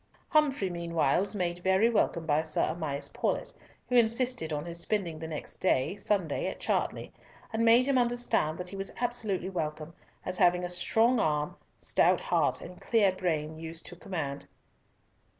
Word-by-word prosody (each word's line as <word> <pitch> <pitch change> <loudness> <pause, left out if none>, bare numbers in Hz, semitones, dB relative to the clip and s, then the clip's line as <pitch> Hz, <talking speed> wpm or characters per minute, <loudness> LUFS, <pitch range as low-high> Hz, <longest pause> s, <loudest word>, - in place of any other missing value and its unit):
Humfrey 280 - +2
meantime 170 -3 +1
was 200 +2 -2
made 175 -2 -1
very 190 +4 +3
welcome 190 -7 +1
by 150 0 +2
Sir 160 -1 0
Amias 150 -4 -3
Paulett, - - -1 0.3
who - - -5
insisted 235 -6 +2
on 150 0 -3
his 170 0 -4
spending 175 -6 -1
the 160 - -5
next 155 -2 -6
day, 185 -2 +1
Sunday, 195 -6 -1
at - - -5
Chartley, - - -2 0.4
and 225 +1 +1
made 230 +2 +6
him 270 -2 +2
understand 240 -10 +1
that 180 0 -5
he 195 - -7
was 195 0 -3
absolutely 215 -6 -1
welcome, 155 -2 -4 0.3
as 185 0 -1
having 180 0 +4
a - - -4
strong 225 +7 +3
arm, 150 -5 0 0.2
stout - - +3
heart, - - +1
and 180 - -10
clear 215 -5 +3
brain 160 -4 -2
used 165 +1 -5
to - - -8
command. 160 -9 -5
180 Hz, 170 wpm, -29 LUFS, 160-220 Hz, 0.4 s, made